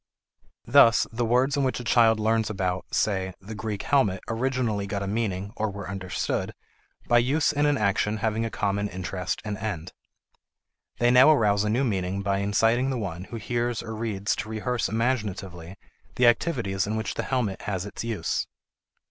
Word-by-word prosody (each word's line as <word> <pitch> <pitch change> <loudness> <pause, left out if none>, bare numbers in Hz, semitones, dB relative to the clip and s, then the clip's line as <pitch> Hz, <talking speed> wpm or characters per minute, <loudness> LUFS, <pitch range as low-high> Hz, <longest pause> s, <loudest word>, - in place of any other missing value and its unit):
Thus 120 -2 +6
the 120 +1 -2
words 130 +4 +2
in 140 - +1
which 130 -1 0
a - - -6
child 115 -2 +4
learns 110 0 +1
about, 95 -3 -2
say, 95 -3 0
the 100 +3 -9
Greek 105 -1 -4
helmet 120 -9 +2
originally 115 -4 -1
got 100 0 -3
a - - -4
meaning 100 -2 -2
(or 110 0 -1
were 100 0 -7
understood) 95 -1 -3 0.5
by 120 - +5
use 140 +7 +2
in 145 0 +2
an 145 -1 +2
action 105 0 +1
having 110 +1 -1
a 115 - -2
common 100 -1 -1
interest 90 -1 -4
and 105 -2 -4
end. 95 -6 -4 1.0
They 120 0 +3
now 130 +4 +7
arouse 105 -8 +3
a 105 - 0
new 120 +6 +1
meaning 95 -4 -1
by 100 0 0
inciting 115 +6 +2
the 130 - -1
one 90 -5 -5
who 120 - -9
hears 120 0 -2
or 110 -1 -6
reads 105 -3 -1
to 110 - -4
rehearse 115 +1 -1
imaginatively 100 -7 -2 0.4
the 125 - +3
activities 115 - +1
in 110 - -2
which 110 0 -2
the - - -2
helmet 120 -8 -2
has 95 -2 -3
its 100 - -6
use. 115 -3 -2
110 Hz, 180 wpm, -26 LUFS, 100-120 Hz, 1.0 s, now